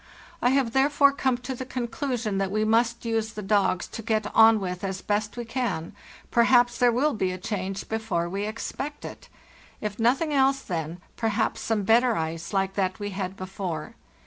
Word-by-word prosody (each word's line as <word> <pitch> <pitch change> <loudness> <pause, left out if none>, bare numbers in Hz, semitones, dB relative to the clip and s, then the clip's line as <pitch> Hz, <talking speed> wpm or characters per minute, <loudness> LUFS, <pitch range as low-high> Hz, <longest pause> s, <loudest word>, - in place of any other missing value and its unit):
I 245 - +4
have 265 -3 +2
therefore 280 +2 +4
come 265 -3 0
to 250 +2 -5
the 260 - -5
conclusion 245 -4 -2
that 195 -1 0
we 215 +2 0
must 235 +2 +2
use 225 -1 -1
the 210 - -6
dogs 195 -2 +2
to 225 - -6
get 215 -1 -1
on 225 -1 +7
with 180 -1 -4
as 190 -1 -3
best 210 +2 -1
we 240 - -4
can—perhaps 240 +2 0
there 245 -1 +5
will 280 +6 +2
be 190 -4 0
a 185 - -4
change 195 0 -4
before 220 -6 -1
we 200 +4 -3
expect 275 +6 -5
it; - - -10 0.5
if 210 0 -4
nothing 265 +7 +2
else, 270 0 +3
then, 165 -1 -4 0.2
perhaps, 225 -1 0
some 220 -3 0
better 235 +3 +4
ice, 165 +1 -3
like 195 -1 0
that 185 -2 -1
we 205 0 -4
had 190 0 -4
before. 185 -4 -5
220 Hz, 180 wpm, -26 LUFS, 195-245 Hz, 0.5 s, on